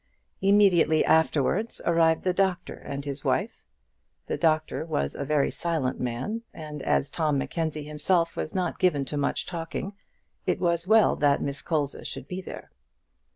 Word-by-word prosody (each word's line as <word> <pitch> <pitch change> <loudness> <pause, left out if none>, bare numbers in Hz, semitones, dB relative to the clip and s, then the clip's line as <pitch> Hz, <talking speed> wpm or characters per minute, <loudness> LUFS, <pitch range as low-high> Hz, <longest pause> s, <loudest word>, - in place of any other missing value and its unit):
Immediately 195 -5 +4
afterwards 160 - +2
arrived 165 -1 +3
the 185 - +1
doctor 185 -2 0
and 140 0 -7
his 140 -1 -4
wife. - - -1 0.6
The - - -2
doctor 155 -1 +1
was 110 - -2
a - - -4
very 145 0 +1
silent 160 -7 -1
man, 125 - -3
and 150 -2 -7
as 135 - +1
Tom 155 -3 +1
Mackenzie 155 +1 -2
himself 165 +3 +1
was 155 - -4
not 180 -3 -1
given 150 -7 +2
to 150 - -5
much 140 - 0
talking, 175 +3 -5 0.5
it - - +1
was 170 -1 0
well 220 0 +5
that 145 -1 +3
Miss 140 0 -3
Colza 150 -4 -2
should - - -6
be 185 +1 -5
there. - - -9
160 Hz, 155 wpm, -26 LUFS, 145-180 Hz, 0.6 s, well